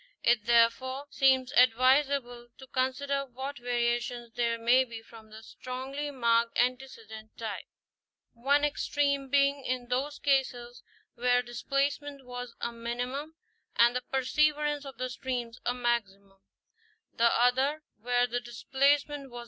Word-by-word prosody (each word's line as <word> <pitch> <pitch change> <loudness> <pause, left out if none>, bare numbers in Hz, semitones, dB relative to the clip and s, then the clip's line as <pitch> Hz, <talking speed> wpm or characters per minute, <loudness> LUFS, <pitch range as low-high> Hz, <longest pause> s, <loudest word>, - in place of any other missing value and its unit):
It 230 -3 +3
therefore 240 +4 +2
seems 265 -2 +3
advisable 255 0 +3
to 265 - -12
consider 265 +2 -1
what 265 +2 -7
variations 240 -1 -2
there 235 -1 0
may 240 +3 +4
be 230 -3 -9
from 225 -1 -15
the 220 +1 -12
strongly 265 +5 -6
marked 235 -3 +1
antecedent 230 -4 -3
type; 220 -3 -5 0.7
one 280 +5 +2
extreme 280 -1 0
being 280 0 +2
in 250 -1 -3
those 275 +4 -1
cases 250 -3 -1 0.3
where 245 +1 +2
the 240 - -14
displacement 275 +3 -2
was 245 -1 -7
a 235 - -3
minimum 245 +6 -5 0.4
and 240 +1 +5
the 250 - 0
perseverance 295 +3 0
of 270 -4 -9
the 255 +1 -2
streams 245 -2 -5
a 245 - +2
maximum, 200 -5 -2 0.7
the 235 0 +3
other 265 +5 +2 0.2
where 245 +2 +2
the 245 0 -2
dis 240 -1 -11
placement 280 +1 +1
was. 240 0 -8
250 Hz, 135 wpm, -29 LUFS, 235-275 Hz, 0.7 s, and